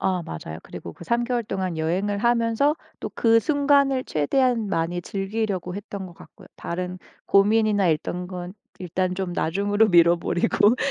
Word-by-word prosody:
아 185 -2 0
맞아요. 80 0 -7
그리고 85 - -9
그 170 - -12
3 235 +5 +1
개월 240 -1 -1
동안 190 -5 -3
여행을 190 +6 -1
하면서 235 +6 +2 0.2
또 - - -4
그 230 -1 +4
순간을 280 -2 +2
최대한 230 - +1
많이 175 0 -1
즐기려고 195 -2 -3
했던 200 -1 -6
것 175 - -12
같고요. - - -16
다른 180 +1 -4 0.3
고민이나 205 -1 +3
있던 175 +3 -1
건 180 -1 -6 0.3
일단 185 0 -2
좀 190 -2 -3
나중으로 205 +6 +1
미뤄 170 0 +6
버리고 205 +7 +2
195 Hz, 325 characters per minute, -24 LUFS, 175-225 Hz, 0.3 s, 미뤄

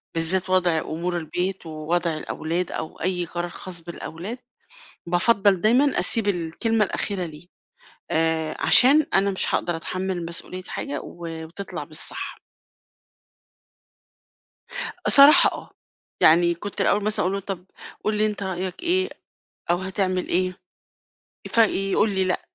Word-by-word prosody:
بالذات 175 +3 +3
وضع 180 -3 +2
أمور 175 +3 -3
البيت 180 +3 -3
ووضع 160 +1 -2
الأولاد 165 +3 -3
أو 160 - -6
أي 180 0 -1
قرار 175 +1 -4
خاص 175 -1 -6
بالأولاد، 170 +6 -7 0.7
بافضّل 195 +1 +3
دايمًا 255 +6 +3
أسيب 225 -4 +3
الكلمة 205 +5 0
الأخيرة 190 -1 -2
ليه، 160 +1 -11 0.6
آآ، 160 -1 0
عشان 285 +4 +6
أنا 200 +1 +3
مش 190 - -1
هاقدر 175 -1 0
أتحمل 185 +1 -4
مسؤولية 180 +2 -5
حاجة 145 -5 -5
و 165 -2 -8
وتطلَع 185 +5 -7
مش - - -6
صح. - - -2 2.7
صراحة 280 +2 +8
آه، - - -10 0.5
يعني 170 +2 +5
كنت 200 +4 -7
الأول 205 - +2
مثلًا 215 0 +1
أقول 185 - 0
له: 200 - -2
"طَب 190 -2 -6 0.4
قُل 215 0 0
لي 215 +1 +2
أنتِ 210 -1 -4
رأيك 190 - -4
إيه؟ 370 +2 +1 0.6
أو 175 - +4
هتعمل 185 0 -2
إيه؟" 185 +1 0 0.9
فيقول 210 -2 +2
لي: 190 -1 +1
"لأ، 185 - 0
185 Hz, 130 wpm, -23 LUFS, 170-200 Hz, 2.7 s, صراحة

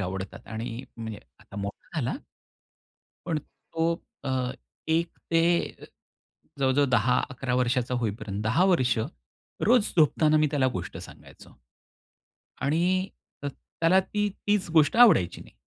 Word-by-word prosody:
आवडतात 95 0 -5
आणि 115 +2 -5
म्हणजे 110 -2 -6 0.2
आता 100 - -14
मोठा 100 0 -6
झाला. - - -1 1.1
पण 160 -2 0
तो 165 +2 -3 0.3
अ, 130 -2 -1 0.4
एक 165 +1 +2 0.2
ते 165 0 +4 1.2
जवळ-जवळ 135 +1 +3
10 125 +1 +3
11 130 -1 -2
वर्षाचा 125 0 +1
होईपर्यंत 105 -2 -3
10 110 +12 +3
वर्ष 125 -7 +2 0.7
रोज 240 -2 +4
झोपताना 155 0 +4
मी 155 0 +4
त्याला 140 -3 +2
गोष्ट 90 -1 -5
सांगायचो - - -13 1.1
आणि 180 +6 +1 0.3
अ, - - -3
त्याला 165 +6 +1
ती 205 +2 -1 0.2
तीच 205 -3 +2
गोष्ट 160 +4 +4
आवडायची 205 - +5
नाही. - - -15
135 Hz, 120 wpm, -27 LUFS, 115-165 Hz, 1.2 s, आवडायची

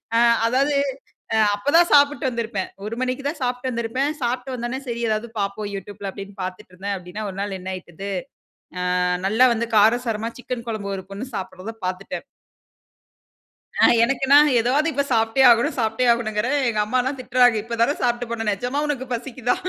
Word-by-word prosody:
ஆ - - +5 0.3
அதாவது 275 +4 +2 0.6
அ - - +3 0.2
அப்ப 245 +8 -2
தான் 345 +1 +6
சாப்பிட்டு 285 +1 +4
வந்திருப்பேன். 225 -5 -3 0.2
1 225 +2 -4
மணிக்கு 255 +2 -2
தான் 300 +1 -4
சாப்ட்டு 250 +1 -1
வந்திருப்பேன். 250 +5 -1
சாப்ட்டு 250 +2 -2
வந்தோன்ன 245 +2 -3
சரி 235 0 -3
ஏதாவது 215 +2 -1
பாப்போம் 200 +1 -2
யூட்யூப்ல 200 +1 -6
அப்டின்னு 200 0 -9
பாத்துட்ருந்தேன் 185 +2 -5
அப்டின்னா 180 +4 -7
ஒரு 190 - -8
நாள் 200 -2 -3
என்ன 185 +1 -7
ஆயிட்டுது, 185 +1 -9 0.9
ஆ - - +2 0.2
நல்லா 225 +6 +5
வந்து 235 +1 -1
காரசாரமா 225 +1 +2
சிக்கன் 250 -1 -5
குழம்பு 200 -3 -3
ஒரு 190 - -8
பொண்ணு 220 +7 -5
சாப்பிடுறத 185 +4 -6
பாத்துட்டேன். 185 +1 -4 1.6
அ, - - +7 0.2
எனக்குனா, 270 +3 +4 0.2
ஏதாவது 275 +7 +2
இப்ப 280 0 0
சாப்ட்டே 225 +3 +2
ஆகணும், 235 0 +4
சாப்ட்டே 225 +2 +1
ஆகணுங்குறே. 230 +1 0 0.2
எங்க 215 -2 -1
அம்மாலாம் 255 +4 0
திட்றாங்க, 250 -2 +4
இப்ப 235 0 -5
தான 285 +5 +3
சாப்ட்டு 240 -1 0
போன. 225 -2 -3
நிஜமா 245 +8 -2
உனக்கு 260 -3 -3
பசிக்குதா. 245 0 -2
235 Hz, 160 wpm, -22 LUFS, 205-255 Hz, 1.6 s, அ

